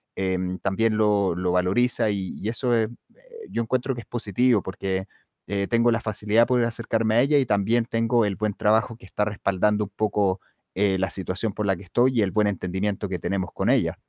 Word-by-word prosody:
em, 95 -1 -2
también 110 +3 +1
lo 105 -4 +2
lo 90 0 -1
valoriza 100 +6 +2
y 95 -2 -4
y - - -4
eso 120 +1 0
es 110 -1 +2 0.6
yo 115 - -1
encuentro 130 +3 -1
que 120 - -6
es - - -18
positivo 120 -1 +1
porque, 95 0 -3 0.4
eh, 100 -1 0
tengo 115 0 +3
la 115 - +1
facilidad 110 +2 +2
de - - 0
poder 125 -1 +2
acercarme 115 -1 -1
a 120 - +5
ella 145 +2 +3
y 130 - +1
también 110 +3 +2
tengo 115 0 +1
el 100 -2 -1
buen 105 0 -1
trabajo 110 +3 +1
que 105 - -16
está 105 - -1
respaldando 105 0 0
un 100 - -12
poco, 100 -3 0 0.4
eh, 95 -1 +2
la 95 - 0
situación 95 +2 -3
por 105 - -3
la 95 - +2
que 95 - -12
estoy, 125 +6 +2
y - - +5
el 95 - 0
buen 105 -1 +2
entendimiento 100 +1 -2
que 90 - -2
tenemos 95 +1 -2
con - - -1
ella. - - +1
105 Hz, 215 wpm, -24 LUFS, 95-115 Hz, 0.6 s, a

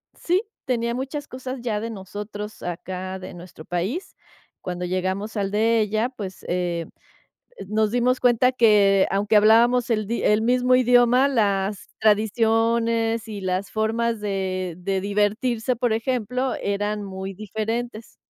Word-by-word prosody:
Sí, 360 +4 0 0.2
tenía 235 -3 0
muchas 275 +3 -4
cosas 255 +1 -6
ya 225 -3 -1
de 230 +2 -4
nosotros 205 +1 -7
acá, 185 +2 -5
de 185 - -9
nuestro 175 -2 -12
país. 195 - -3 0.5
Cuando 180 0 -4
llegamos 190 +4 -2
al 200 -2 -1
de 225 +2 +2
ella, 215 +3 0
pues, 200 -7 -8
eh, 175 -2 -1 0.8
nos 215 +1 +1
dimos 245 +1 +2
cuenta 250 0 +4
que 210 -5 +4
aunque 200 +2 +1
hablábamos 235 +4 +5
el 215 -2 0
di 235 +2 -2
el 210 +1 +3
mismo 250 +2 +2
idioma, 250 +1 +5
las 200 -6 0
tradiciones 225 +1 +2
y 210 -2 -6
las 185 +1 -2
formas 225 +1 0
de 190 -3 -2
de 190 +1 -1
divertirse, 215 +5 0
por 240 -1 0
ejemplo, 250 +2 -1
eran 205 +1 -1
muy 190 0 -6
diferentes. 220 +3 -4
215 Hz, 140 wpm, -23 LUFS, 195-235 Hz, 0.8 s, hablábamos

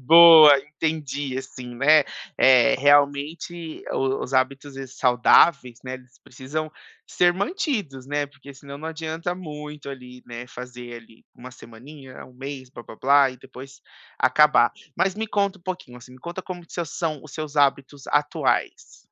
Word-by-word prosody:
Boa, 160 -3 +9
entendi, 145 -2 -4
assim, 130 -2 -8
né, 150 +4 +5 0.4
eh, 130 +1 +5
realmente 145 +4 0
o 135 0 -1
os 130 - -7
hábitos 135 +2 -1 0.2
saudáveis, 125 0 +3
né, 130 0 -5
eles 130 0 -15
precisam 150 +5 -6 0.3
ser 175 0 +2
mantidos, 200 - -3
né, 145 0 -1
porque 140 0 -15
senão 140 0 -11
não 160 +1 -6
adianta 160 +2 -4
muito 150 -4 -9
ali, 125 -2 -11
né, 120 +1 -8
fazer 125 -1 -10
ali 115 -1 -15
1 125 +1 -12
semaninha, 130 +3 -13
1 130 - -17
mês, 130 0 -8
blá, 120 - -11
blá, 110 - -13
blá, 140 +1 +4
e 130 - -12
depois 135 +2 -13 0.4
acabar. 130 -1 +4 0.2
Mas 190 0 +1
me 220 +1 -4
conta 200 -2 -1
um - - -28
pouquinho, 180 -9 -7
assim, 125 +1 -15
me 130 - -15
conta 170 +5 -7
como 180 -1 -8
que 175 - -7
s 165 -5 -5
são 160 -5 -3
os 155 - -14
seus 155 -1 -6
hábitos 140 -1 0
atuais. 145 0 -1
140 Hz, 160 wpm, -23 LUFS, 130-155 Hz, 0.4 s, Boa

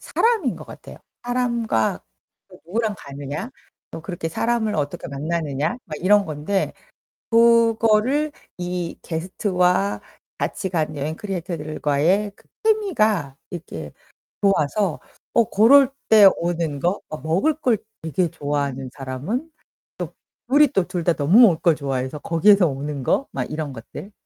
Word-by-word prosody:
사람인 445 - +1
것 - - -10
같아요. - - -12 0.3
사람과 235 - 0 0.5
또 - - -16
누구랑 215 +3 -1
가느냐. 140 - -6 0.4
또 165 - -7
그렇게 165 -1 -5
사람을 225 +3 0
어떻게 145 -2 -3
만나느냐? 150 0 -2
막 155 -6 -7
이런 205 +2 +4
건데. 155 +6 -2 0.6
그거를 230 +4 +4 0.3
이 175 -1 -3
게스트와 180 +3 0 0.4
같이 190 - -3
간 155 -3 -1
여행 150 +3 -3
크리에이터들과의 170 0 -1
그 - - -25 0.2
케미가 220 - +1
이렇게 80 - -7 0.5
좋아서 195 -1 +1 0.4
어 235 - +6
그럴 265 +6 +6 0.2
때 215 -3 +9
오는 170 -4 -2
거 175 +7 0
어 155 - -5
먹을 170 - +1
걸 260 -7 +1 0.2
되게 165 +2 0
좋아하는 145 -4 -3
사람은 145 - -4 0.5
또 - - -4 0.4
둘이 290 +3 +6
또 190 -6 0
둘 180 -2 -3
다 170 0 +3
너무 160 +10 +4
먹을 190 -9 +6
걸 170 -2 +4
좋아해서 135 0 -3
거기에서 180 +5 +4
오는 140 0 -4
거 275 - +1
막 130 - -2
이런 150 -3 -4
것들. 125 - -10
175 Hz, 280 characters per minute, -22 LUFS, 150-220 Hz, 0.6 s, 때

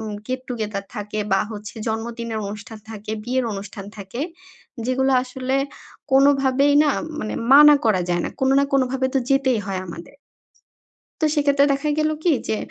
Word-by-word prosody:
উম 215 -1 -5
get 255 0 -2
together 215 -4 -3
থাকে 210 +1 -4
বা 195 - +4
হচ্ছে 210 +1 -8
জন্মদিনের 230 0 -3
অনুষ্ঠান 210 +2 -8
থাকে, 215 -1 -7
বিয়ের 255 +1 0
অনুষ্ঠান 195 0 -7
থাকে। 200 +4 -7 0.7
যেগুলো 265 +1 +1
আসলে 260 +1 -2 0.6
কোনো 275 +1 +7
ভাবেই 275 +2 +3
না 305 - +2
উম 315 - -6
মানে 215 - -4 0.2
মানা 295 +1 +9
করা 215 -5 +3
যায় 175 -1 +1
না। - - -3
কোনো 265 0 +3
না 280 - +4
কোনো 275 -1 +4
ভাবে 265 0 0
তো 270 - +4
যেতেই 265 -3 +3
হয় 190 -2 -2
আমাদে 170 0 -9 1.1
তো - - +3
সেক্ষেত্রে 285 -2 +3
দেখা 280 +2 -1
গেলো 310 0 +1
কি? 345 - +4 0.2
যে, 220 - +1
245 Hz, 175 wpm, -22 LUFS, 210-270 Hz, 1.1 s, মানা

